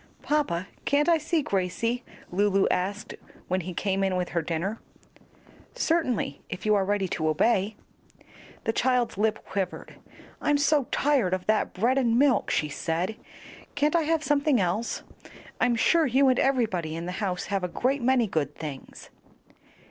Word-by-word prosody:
"Papa, 240 - 0 0.2
can't 290 +2 +2
I 335 -2 +4
see 310 0 0
Gracie?" 230 +6 -1 0.3
Lulu 195 +1 +2
asked 200 +3 -2 0.3
when 185 +1 0
he 175 +1 -7
came 195 +1 0
in 190 -1 +1
with 180 -1 -1
her 170 - 0
dinner. 170 +7 -3 1.0
"Certainly, 320 - 0
if 180 - -6
you 215 - +4
are 200 -2 +3
ready 200 0 0
to 155 -1 -1
obey." 200 +5 +2 0.9
The 225 - 0
child's 250 -5 +1
lip 220 0 0
quivered. 190 -2 -4 0.4
"I'm 295 -1 +2
so 285 -1 +2
tired 265 -11 +2
of 185 - -7
that 215 0 +1
bread 240 +8 +2
and 235 -3 +2
milk," 275 -1 +3
she 150 - +1
said. 165 +7 -2 0.6
"Can't 295 +2 +2
I 335 - +4
have 320 0 0
something 285 -2 +2
else? 190 +5 -1 0.6
I'm 245 -1 +3
sure 320 +7 +3
you 265 +2 +4
and 255 - +2
everybody 205 -12 0
in 165 +1 -5
the 180 - -4
house 185 -3 -1
have 195 -2 0
a - - 0
great 260 +9 -1
many 250 -1 +3
good 150 -7 -2
things." 145 -4 -8
215 Hz, 165 wpm, -26 LUFS, 185-270 Hz, 1.0 s, I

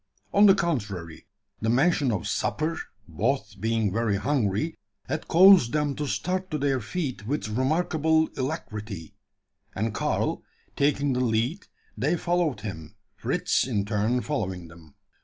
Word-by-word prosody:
On 205 +1 +7
the 195 - +7
contrary, 105 - -3 0.3
the 110 - 0
mention 140 +1 +3
of 105 -5 -2
supper 160 +2 -1 0.3
both 105 - -1
being 110 -2 +1
very 115 -2 +1
hungry 125 +3 0 0.3
had - - -3
caused 180 -8 +7
them 150 -2 +1
to 150 - -2
start 185 +5 -2
to 155 - -2
their 135 -2 +1
feet 130 -4 -4
with 140 -4 -2
remarkable 160 +5 +2
alacrity; 105 -9 -5 0.6
and 110 +2 -1
Karl, - - -1 0.3
taking 140 -1 +1
the 125 - 0
lead, 125 - 0 0.3
they 150 +10 0
followed 170 -9 0
him, 80 -7 -7 0.2
Fritz - - 0
in 105 -6 -1
turn 110 +4 0
following 95 - -3
them. 80 -3 -16
125 Hz, 140 wpm, -26 LUFS, 105-155 Hz, 0.6 s, On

